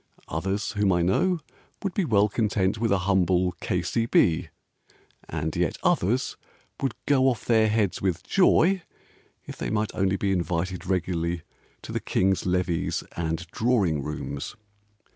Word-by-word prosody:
Others, 95 +6 -2
whom 105 -2 +2
I 90 -1 +2
know, 165 - +2 0.4
Would 195 -3 -2
be 195 - 0
well 105 -6 +4
content 105 -2 0
with 115 -2 +1
a 100 - +4
humble 95 -2 +2
K.C.B. 90 -1 +1 0.8
And 80 -1 -3
yet - - 0
others 120 +9 +1 0.4
Would 135 -4 -1
go 135 -2 +3
off 125 -4 0
their 110 -2 +4
heads 105 -3 0
with 95 -3 -1
joy 190 0 +4 0.6
If - - -8
they - - -3
might 110 0 -1
only 95 0 +1
be 100 0 0
invited 90 0 -2
regularly 85 -2 -1 0.4
To - - -7
the - - -1
King's 95 0 +1
Levees 90 -2 0
and 80 0 -2
Droring 105 - +1
Rooms. 70 -1 -5
95 Hz, 140 wpm, -26 LUFS, 90-110 Hz, 0.8 s, well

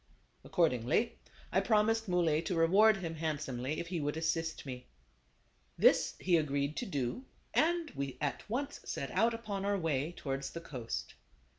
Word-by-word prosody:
Accordingly, 160 - +1 0.3
I - - +3
promised 225 0 +2
Muley 170 -4 +2
to 180 - -1
reward 195 +6 +5
him 170 -4 -4
handsomely 150 -3 -2
if 170 - -5
he 175 -3 -2
would 145 +2 -1
assist 160 -1 -1
me. 125 -2 -7 0.9
This - - +4
he 180 -2 +3
agreed 145 -1 0
to 245 - -2
do, 145 - -2 0.3
and 335 0 +2
we 140 -2 -4
at 145 +7 -3
once 280 +5 -2
set - - -4
out 230 0 +3
upon 210 -4 -4
our 200 0 +1
way 160 -2 -1
towards 135 -4 -3
the 170 - -5
coast. 125 -8 -5
165 Hz, 155 wpm, -33 LUFS, 145-210 Hz, 0.9 s, reward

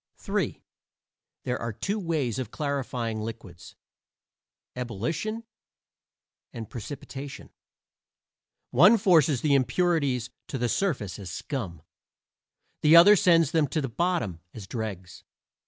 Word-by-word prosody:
III - - -1 0.8
There 125 0 -2
are 115 - -2
two 200 - -3
ways 155 - -1
of 125 -5 -4
clarifying 125 -6 -3
liquids 105 -6 -9 1.0
ebullition 155 - -3 1.1
and 115 -2 -7
precipitation; 135 +3 -8 1.2
one 185 - +7
forces 165 - +4
the 150 -2 +2
impurities 140 -4 +1 0.2
to - - -4
the 120 -1 -1
surface 125 - -1
as 95 -3 -7
scum, 85 - -5 1.0
the 150 +2 +6
other 175 +5 +9
sends 165 -5 +4
them 160 -3 +2
to 155 - -2
the 135 -3 -2
bottom 165 - -1 0.2
as 110 -4 -8
dregs. 95 -4 -6
135 Hz, 110 wpm, -27 LUFS, 115-165 Hz, 1.2 s, other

